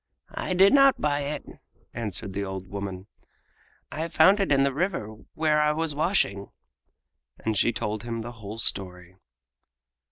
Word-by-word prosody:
"I 185 - -2
did 195 +2 +6
not 275 -2 +6
buy 145 -1 +1
it," 150 +2 -4 0.5
answered 100 -4 -4
the 100 +1 -2
old 95 -1 -5
woman. 100 -1 -6 0.9
"I 160 +2 -3
found 190 +4 +5
it 195 -6 0
in 135 -1 +4
the 140 -1 +1
river 150 - -2 0.2
where 155 -1 +2
I 150 0 +3
was 160 0 -1
washing." 145 - 0 1.0
And 110 -1 0
she 120 - +3
told 110 -2 -3
him 115 -1 -4
the 120 +2 -6
whole 110 -2 -9
story. 90 -4 -3
120 Hz, 155 wpm, -26 LUFS, 100-155 Hz, 1.0 s, did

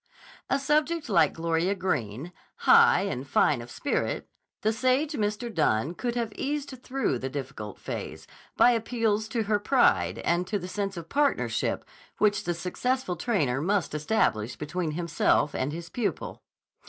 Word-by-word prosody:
A 275 - +3
subject 300 +2 0
like 165 -7 +4
Gloria 165 +3 0
Greene, 155 - -2 0.3
high 465 +1 +7
and - - -3
fine - - +3
of - - -10
spirit, - - -2 0.4
the 220 +1 +2
sage 255 +6 +1
Mr. 220 -1 -2
Dunne 150 - +1
could 240 +5 -3
have 230 -3 -2
eased 280 -2 -4
through 260 - -1
the 130 - -3
difficult 130 -7 -6
phase - - -6 0.3
by 245 - +7
appeals 225 -2 0
to 225 0 -1
her 210 0 +1
pride 95 - +3
and 175 +1 +1
to 205 - 0
the 180 -2 -6
sense 195 0 -3
of 165 -1 -7
partnership 285 - 0 0.3
which 205 -1 +2
the 175 0 -1
successful 185 +4 -1
trainer 160 - 0
must 190 -1 0
establish 150 - 0
between 155 +1 -3
himself 160 -3 +1
and 130 +3 -1
his 170 +2 -6
pupil. 230 +4 -3
195 Hz, 155 wpm, -27 LUFS, 160-245 Hz, 0.4 s, high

